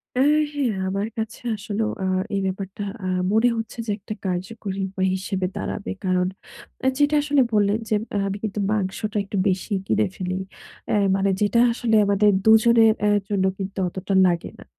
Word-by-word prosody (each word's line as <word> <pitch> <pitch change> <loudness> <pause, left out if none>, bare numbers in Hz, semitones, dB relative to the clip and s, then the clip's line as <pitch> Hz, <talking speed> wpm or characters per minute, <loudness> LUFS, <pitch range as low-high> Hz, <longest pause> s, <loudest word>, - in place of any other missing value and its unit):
আ - - 0 0.3
হ্যাঁ 275 -5 0 0.2
আমার 195 +2 -1
কাছে 220 0 -4
আসলেও 215 +1 -2
আ - - 0 0.3
এই 195 - 0
ব্যাপারটা 190 +1 -4 0.2
আ - - -1 0.2
মনে 225 +3 +4
হচ্ছে 225 0 -5
যে 210 - -2
একটা 205 +2 -7
কার্যকরী 190 +2 -3
উপায় 190 0 -1
হিসেবে 190 0 -2
দাঁড়াবে। 200 - -4
কারণ 180 0 +2 0.7
যেটা 290 +1 +3
আসলে 285 -2 +3
বললেন 205 0 +3
যে 215 - +2 0.2
আ - - +2
আমি 195 +1 -3
কিন্তু 210 -1 -3
মাংসটা 210 +1 -2
একটু 200 0 -5
বেশি 190 +3 -1 0.2
কিনে 215 - +2
ফেলি। 185 0 -3 0.5
অ্যা - - +2 0.2
মানে 195 0 +1
যেটা 210 +3 +3
আসলে 230 -1 0
আমাদের 200 +1 +3 0.2
দুজনের 225 0 +6
এ্যা 210 - +4 0.2
জন্য 195 -2 +1
কিন্তু 195 0 -6
অতটা 190 +2 -4
লাগে 170 -1 -1
না। - - -11
205 Hz, 170 wpm, -23 LUFS, 190-220 Hz, 0.7 s, দুজনের